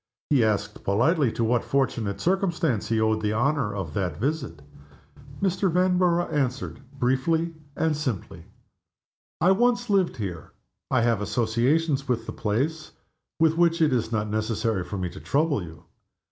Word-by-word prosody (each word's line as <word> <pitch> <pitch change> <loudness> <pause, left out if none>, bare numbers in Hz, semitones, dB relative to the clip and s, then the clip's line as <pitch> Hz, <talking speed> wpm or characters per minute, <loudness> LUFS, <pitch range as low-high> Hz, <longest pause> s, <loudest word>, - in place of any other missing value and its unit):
He 135 -5 +5
asked 105 -1 -1
politely 125 - +2
to 115 - -1
what 115 +1 +2
fortunate 115 -7 -1
circumstance 170 - 0
he 115 0 +1
owed 110 0 +1
the 105 0 0
honor 135 0 +1
of 90 -7 -4
that 90 -5 -2
visit. 130 - -3 0.8
Mr. 190 -1 +1
Vanborough 180 -1 +2
answered, 135 -3 -1 0.2
briefly 160 +7 +1 0.2
and 160 -1 +1
simply, 130 - -4 0.9
"I 180 - +4
once 240 +2 +2
lived 190 -6 +2
here; 90 -8 -6 0.4
I - - +2
have 115 -3 +2
associations 130 +7 +1
with 115 -3 -1
the - - -6
place 140 +9 -2 0.5
with 160 0 +3
which 170 0 +3
it 155 -4 +3
is 120 -2 0
not 110 -2 0
necessary 110 -1 -1
for 100 - -6
me 90 -1 -2
to 95 - -10
trouble 145 -3 +1
you. 80 -2 -10
125 Hz, 150 wpm, -25 LUFS, 110-160 Hz, 0.9 s, He